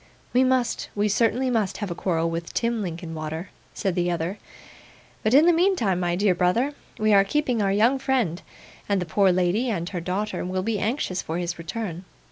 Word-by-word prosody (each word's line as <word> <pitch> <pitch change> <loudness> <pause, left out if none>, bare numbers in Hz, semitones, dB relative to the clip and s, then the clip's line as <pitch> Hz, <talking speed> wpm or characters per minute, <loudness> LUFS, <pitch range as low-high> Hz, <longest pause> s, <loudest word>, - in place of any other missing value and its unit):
'We 255 +1 +4
must. 255 -2 0
We 205 0 +2
certainly 235 +5 +1
must 215 -5 0
have 205 -4 -4
a - - 0
quarrel 165 -2 0
with 165 0 -4
Tim 235 -1 0
Linkinwater,' 165 -1 -5 0.2
said 195 -4 -1
the 175 0 0
other. 170 +3 -2 0.8
'But 215 +4 +2
in 300 +3 +7
the 345 - +6
meantime, 330 - +2
my 175 -1 0
dear 195 0 +3
brother, 185 +11 +1 0.2
we 215 0 +3
are 195 -1 +7
keeping 250 +1 0
our 195 -1 +2
young 230 +7 +3
friend; 245 - 0 0.5
and 200 -1 +2
the 180 - -2
poor 190 +3 +3
lady 185 +7 +1
and 175 -6 -2
her 180 -3 -4
daughter 190 +5 -2
will 185 +1 -2
be 215 0 -1
anxious 210 -3 -1
for 160 - -4
his 175 -1 -3
return. 180 0 -5
195 Hz, 195 wpm, -24 LUFS, 175-230 Hz, 0.8 s, in